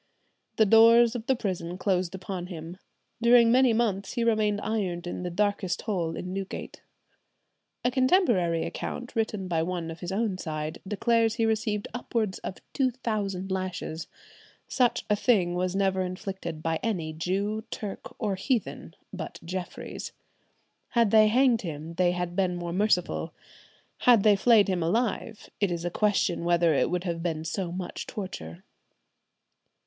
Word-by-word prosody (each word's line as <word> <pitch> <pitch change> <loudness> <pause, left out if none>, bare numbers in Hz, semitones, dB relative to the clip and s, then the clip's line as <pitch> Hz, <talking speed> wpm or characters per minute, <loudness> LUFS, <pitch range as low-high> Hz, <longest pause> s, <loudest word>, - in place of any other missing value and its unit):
"The 220 - +5
doors 230 +2 +7
of 235 0 -5
the 265 - +3
prison 180 -6 -3
closed 185 -1 0
upon 185 -1 -5
him. 170 0 -8 0.4
During 235 0 +6
many 255 0 +5
months 215 -4 0
he 235 - 0
remained 215 -3 +2
ironed 185 -6 -2
in 175 - -4
the 180 - -3
darkest 200 -1 -1
hole 175 -7 -1
in 180 +1 -5
Newgate." 195 0 -6 1.0
A 245 - +3
contemporary 245 - +3
account 245 +1 -5
written 215 -4 -1
by 165 -2 0
one 170 -1 -3
of 165 - -9
his 175 - -5
own 200 -2 -1
side 155 -1 -4
declares 225 +2 +2
he 230 -1 +1
received 215 -2 0
"upwards 225 -5 -2
of 185 - -6 0.2
two 265 -2 +2
thousand 205 -6 -3
lashes—such 190 - -3
a 210 - +3
thing 200 -6 +2
was 180 +1 -1
never 190 -1 +1
inflicted 185 -3 -5
by 165 -1 0
any 170 -9 -2
Jew, 200 +6 -2
Turk, 205 -3 -7
or 210 -4 -1
heathen 225 +5 -2 0.2
but - - -6
Jeffries.... 180 +1 -6 0.8
Had 230 -3 +4
they 215 -1 +7
hanged 245 +1 +4
him 160 -2 -6
they 175 +1 +2
had 180 -1 -3
been 185 -2 +1
more 175 -1 -4
merciful; 195 -2 0 0.6
had 235 -5 +5
they 210 -1 +6
flayed 215 0 +5
him 185 -3 0
alive 220 +4 -1
it 200 - +2
is 170 0 -3
a 175 - -1
question 200 -4 +1
whether 170 -1 +3
it 140 - +2
would 180 0 -1
have 170 -2 -3
been 160 -2 -2
so 175 +1 -3
much 180 0 -5
torture." 90 - -7
195 Hz, 155 wpm, -27 LUFS, 175-220 Hz, 1.0 s, doors